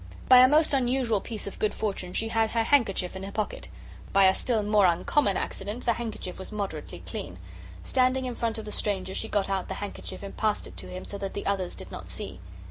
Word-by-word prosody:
By 255 -1 +9
a 255 - +9
most 305 +2 +4
unusual 250 -5 +2
piece 225 -3 -5
of 200 - -7
good 210 -1 +1
fortune 195 -4 -3
she 225 - 0
had 225 0 +1
a 230 - +3
handkerchief 210 -8 +2
in 190 - -5
her 195 +1 -6
pocket. 215 0 -3 0.5
By 195 - +6
a 190 0 +7
still 225 -1 0
more 205 -2 +5
uncommon 190 +6 +2
accident 205 +6 -4
the 235 - +4
handkerchief 220 -6 -5
was 190 - -6
moderately 205 -2 -5
clean. - - -5 0.5
Standing 260 0 +2
in 250 - -2
front 230 -1 -1
of 220 - -6
the 210 - -6
stranger, 190 -3 0
she 220 - -2
got 205 -3 +1
out 195 -1 -1
the - - -4
handkerchief 205 0 -6
and 200 - -7
passed 215 -2 0
it - - -10
to - - -5
him 185 0 -6
so 200 - -7
that 195 -1 -4
the 200 - -4
others 195 -3 -1
did - - -10
not - - -8
see. 90 - -5
210 Hz, 230 wpm, -27 LUFS, 195-235 Hz, 0.5 s, By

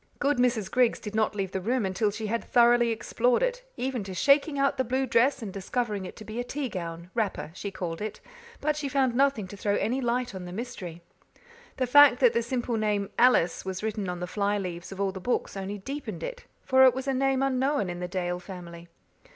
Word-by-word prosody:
Good 285 -1 +1
Mrs. 235 -6 +1
Griggs 250 -2 +3
did 210 - -7
not 215 -1 +1
leave 195 -2 -2
the 190 - -3
room 235 +3 0
until 190 +3 +1
she 215 +2 -5
had 230 +2 -1
thoroughly 240 -1 +4
explored 235 - +1
it, - - -1
even 255 -3 -2
to 190 -1 -6
shaking 280 - +3
out 275 0 +2
the 260 - +2
blue 260 +2 0
dress 250 +2 +2
and 195 -4 -6
discovering 205 0 -2
it - - -8
to 215 - -11
be 220 +2 -5
a - - 0
tea 265 +1 -4
gown 170 -2 -6
wrapper, 210 -8 -2
she 200 - -5
called 175 -3 -5
it. 215 0 -4 0.4
But 300 +1 0
she 295 -2 -3
found 265 -2 +2
nothing 270 -6 +2
to 205 - -8
throw 205 0 0
any 250 +6 0
light 245 -1 -1
on 185 -1 -6
the 175 - -7
mystery. 180 -6 -6 0.7
The 260 - +1
fact 275 0 +7
that 245 -3 +5
the 235 - +2
simple 240 -1 -2
name 210 -2 0
"Alice" 245 -8 +4
was 190 +1 -5
written 215 -3 -2
on 180 0 -4
the 180 - -3
fly 205 +2 0
leaves 175 -3 -5
of 195 - -8
all 200 -1 +1
the 190 0 -8
books 245 0 -1
only 195 +1 -4
deepened 275 - -6
it, - - -6 0.2
for 260 0 +5
it 255 -1 +5
was 265 +1 -4
a 270 - +1
name 270 0 +1
unknown 270 -3 +1
in 175 0 -5
the 180 - -3
Dale 180 -1 -2
family. 175 -2 -10
225 Hz, 230 wpm, -27 LUFS, 190-260 Hz, 0.7 s, fact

